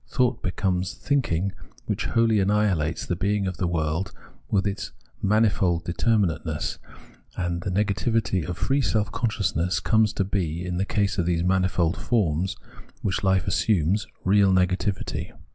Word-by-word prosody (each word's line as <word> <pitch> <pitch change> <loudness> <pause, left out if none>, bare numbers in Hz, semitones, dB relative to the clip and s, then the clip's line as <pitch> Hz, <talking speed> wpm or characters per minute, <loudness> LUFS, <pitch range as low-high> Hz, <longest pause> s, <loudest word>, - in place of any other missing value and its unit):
Thought 125 -2 +1
becomes 90 0 -1
thinking 100 - 0 0.3
which - - -2
wholly 115 -2 +3
annihilates 95 -6 +1
the 90 - -1
being 100 +3 0
of 95 -2 -3
the 90 - 0
world 80 +1 -1 0.4
with 100 -1 +1
its 100 -1 -3 0.3
manifold 100 -5 +2
determinateness, 85 -5 0 0.6
and 85 -1 -2
the 95 - -3
negativity 105 0 0
of 90 +3 -5
free 135 +10 +1
self 110 -5 0
consciousness 100 - 0
comes 110 +1 +3
to - - 0
be, 90 -3 -2
in 90 -1 -3
the 95 - 0
case 100 -2 0
of 85 - +1
these 85 -1 +1
manifold 90 -2 +1
forms 95 -6 0 0.5
which 95 -2 0
hfe 95 -3 +2
assumes, 95 0 +1 0.2
real 100 0 +4
negativity. 95 +2 0
95 Hz, 145 wpm, -25 LUFS, 90-105 Hz, 0.6 s, real